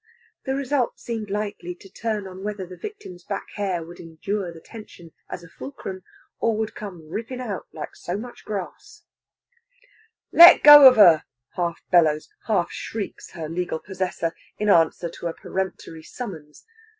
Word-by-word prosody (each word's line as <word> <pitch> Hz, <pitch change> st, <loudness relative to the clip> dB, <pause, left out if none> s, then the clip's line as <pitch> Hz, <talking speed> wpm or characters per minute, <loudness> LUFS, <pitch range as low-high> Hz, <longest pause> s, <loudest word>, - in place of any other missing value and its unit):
The 265 Hz, -1 st, -1 dB
result 275 Hz, -2 st, -1 dB
seemed 225 Hz, -3 st, -5 dB
likely 200 Hz, -4 st, -4 dB
to 195 Hz, -, -16 dB
turn 210 Hz, +1 st, -4 dB
on 190 Hz, 0 st, -9 dB
whether 205 Hz, -2 st, -4 dB
the 180 Hz, +1 st, -11 dB
victim's 400 Hz, -, -9 dB
back 200 Hz, +1 st, -5 dB
hair 190 Hz, -5 st, -2 dB
would 175 Hz, +1 st, -12 dB
endure 175 Hz, +3 st, -4 dB
the 165 Hz, -, -12 dB
tension 175 Hz, -4 st, -13 dB, 0.2 s
as 175 Hz, -, -7 dB
a -, -, -12 dB
fulcrum, 190 Hz, -3 st, -8 dB, 0.4 s
or 225 Hz, -2 st, +1 dB
would 220 Hz, 0 st, -3 dB
come 180 Hz, -7 st, -9 dB
rippin' 230 Hz, +9 st, -5 dB
out 215 Hz, -7 st, -5 dB
like -, -, -8 dB
so 175 Hz, +2 st, -5 dB
much 240 Hz, +3 st, -9 dB
grarse. 200 Hz, -4 st, -7 dB, 1.3 s
"Let 340 Hz, +1 st, +9 dB
go 295 Hz, -2 st, +11 dB
of 255 Hz, -, +1 dB
her!" 175 Hz, -8 st, +7 dB, 0.3 s
half 170 Hz, -1 st, -3 dB
bellows, 155 Hz, -4 st, +3 dB, 0.2 s
half 205 Hz, -6 st, +1 dB
shrieks 215 Hz, -3 st, -6 dB
her 160 Hz, -3 st, -6 dB
legal 175 Hz, +1 st, -3 dB
possessor, 180 Hz, -2 st, -3 dB, 0.2 s
in 210 Hz, 0 st, -1 dB
answer 170 Hz, -1 st, +3 dB
to 170 Hz, +1 st, -6 dB
a 165 Hz, -, -5 dB
peremptory 190 Hz, -4 st, -5 dB
summons. 160 Hz, -7 st, -9 dB
190 Hz, 160 wpm, -23 LUFS, 170-220 Hz, 1.3 s, go